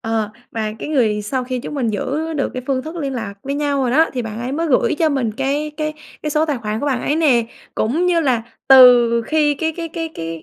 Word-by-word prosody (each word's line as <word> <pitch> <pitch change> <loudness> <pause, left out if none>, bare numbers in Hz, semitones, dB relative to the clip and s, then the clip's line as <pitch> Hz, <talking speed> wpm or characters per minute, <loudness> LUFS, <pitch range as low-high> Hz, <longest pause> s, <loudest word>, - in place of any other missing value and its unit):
Ờ, 225 -2 -1 0.2
mà 215 -2 -2
cái - - -6
người 225 -8 +1
sau 255 +5 -2
khi 255 0 -3
chúng 295 - -7
mình 255 -5 0
giữ 295 +10 -2
được 290 -3 -1
cái 255 - -4
phương 265 -2 0
thức 315 +4 -7
liên 280 -5 -3
lạc 225 -5 -5
với 275 +1 -3
nhau 285 -1 0
rồi 250 - 0
đó, 315 +6 +4
thì 250 - -2
bạn 220 -1 -6
ấy 250 +2 -3
mới 330 +4 -1
gửi 270 -5 +2
cho 325 - +3
mình 265 -7 -1
cái 275 +5 -1
cái 305 -1 -2 0.3
cái 300 - -2
số 305 +1 +2
tài 295 -5 -1
khoản 215 -1 -3
của 290 - -2
bạn 260 -4 0
ấy 295 - 0
nè. 260 -8 +3 0.3
Cũng 305 +12 0
như 345 -2 +3
là 255 -7 +1 0.3
từ 245 -3 +7
khi 300 +3 +1
cái 320 +3 -2
cái 330 +1 -5
cái 325 0 -4
cái 165 -1 -6
270 Hz, 260 wpm, -19 LUFS, 235-305 Hz, 0.3 s, từ